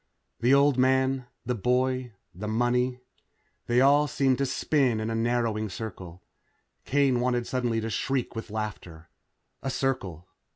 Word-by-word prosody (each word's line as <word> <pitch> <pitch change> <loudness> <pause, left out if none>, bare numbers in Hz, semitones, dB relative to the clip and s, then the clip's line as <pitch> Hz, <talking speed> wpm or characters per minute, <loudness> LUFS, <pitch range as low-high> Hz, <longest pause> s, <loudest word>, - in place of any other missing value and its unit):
The 120 +2 +2
old 140 -2 +4
man 130 0 +2 0.2
the 125 - 0
boy 125 +2 0 0.2
the 105 +4 -6
money. 125 +3 0 0.7
They 120 +1 +3
all 145 +2 +5
seemed 135 -2 +1
to 140 - +1
spin 130 -3 +1
in 110 +1 -2
a - - -1
narrowing 115 -2 0
circle. 90 -4 -8 0.6
Kane 135 -3 +2
wanted 120 -1 0
suddenly 120 -3 -1
to 110 - -3
shriek 135 -1 -2
with 115 - -6
laughter. 100 -7 -6 0.5
A 135 - -3
circle. 100 - -2
125 Hz, 140 wpm, -27 LUFS, 110-130 Hz, 0.7 s, all